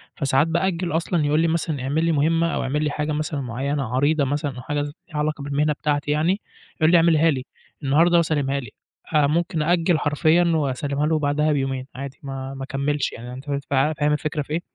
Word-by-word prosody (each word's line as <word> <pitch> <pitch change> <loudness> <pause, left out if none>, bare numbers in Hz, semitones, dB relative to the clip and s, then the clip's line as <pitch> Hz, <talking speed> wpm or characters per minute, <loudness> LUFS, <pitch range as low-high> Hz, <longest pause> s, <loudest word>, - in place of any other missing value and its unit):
فساعات 140 +1 +2
بأجّل 170 +1 0
أصلًا 165 -1 0
يقول 150 +2 +2
لي 165 - +3
مثلًا 160 -4 -1
اعمِل 155 +5 0
لي 165 - +2
مُهمّة 165 +3 +2
أو - - -1
اعمِل 150 +3 -1
لي 150 - +1
حاجة 150 +1 -2
مثلًا 150 -1 -2
معيّنة، 135 +3 -2
عريضة 145 +2 +2
مثلًا 145 -1 -2
أو 125 - -7
حاجة 145 +3 -2
ز 145 0 -4 0.2
ليها 155 - -6
علاقة 150 -1 -1
بالمهنة 145 +2 +1
بتاعتي 145 0 -1
يعني، 170 +7 +1 0.3
يقُول 155 +1 +3
لي 175 - +7
اعمِلها 165 -1 +4
لي، 130 -2 -3 0.4
النهاردة 165 +5 +4
وسلّمها 145 -4 0
لي 125 - -8 0.4
آآ، 150 -2 +4
ممكن 165 0 0
أأجِّل 170 0 +2
حرفيًا 155 +4 +3
وأسلّمها 140 0 -1
له 160 -1 +1
بعدها 150 +1 +1
بيومين 135 -2 -1
عادي، 135 0 -7
ما 135 0 -5
ما 135 0 -6
أكمّلش 140 +1 -1
يعني 120 +1 -8
أنت 130 +3 -9
فهمت 140 -1 -3
ف - - -2 0.3
فاهم 150 0 +2
الفكرة 150 0 -2
في 145 - -6
إيه؟ 170 - 0
150 Hz, 210 wpm, -23 LUFS, 140-160 Hz, 0.4 s, لي